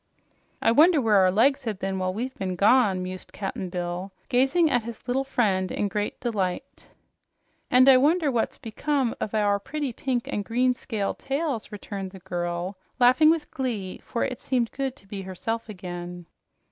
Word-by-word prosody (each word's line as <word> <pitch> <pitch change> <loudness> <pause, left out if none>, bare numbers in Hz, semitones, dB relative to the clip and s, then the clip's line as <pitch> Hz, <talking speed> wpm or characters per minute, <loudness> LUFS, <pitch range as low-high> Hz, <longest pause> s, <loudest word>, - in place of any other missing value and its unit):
"I - - +5
wonder 310 +6 +6
where 220 -5 +3
our 185 -1 +5
legs 245 +8 +3
have 215 -4 -2
been 190 0 -3
while 185 0 0
we've 245 +7 -4
been 185 -5 -3
gone?" 200 -2 +4
mused 185 0 -7
Cap'n 195 -2 -4
Bill, 175 +2 -4 0.2
gazing 270 +6 +3
at 245 -2 +3
his 230 +2 -9
little 260 +2 +1
friend 200 -8 0
in 205 - -1
great 210 0 -3
delight. 195 -7 -3 0.8
"And 255 +1 +6
I 265 -1 +9
wonder 300 +2 +3
what's 235 -3 -1
become 265 +1 -1
of 215 - -2
our 205 -1 +2
pretty 285 +4 -4
pink 250 -1 -2
and 205 - -2
green 250 +4 +2
scaled 220 -5 -3
tails!" 275 -5 -2
returned 200 -2 -6
the 190 - -10
girl, 175 +2 -3 0.2
laughing 255 +6 +6
with 320 -2 0
glee, 220 -8 -3
for 235 - -2
it 255 -3 -3
seemed 245 -3 0
good 270 -1 -3
to 200 - -18
be 195 0 -6
herself 220 +5 -4
again. 175 -3 -7
225 Hz, 175 wpm, -26 LUFS, 190-260 Hz, 0.8 s, I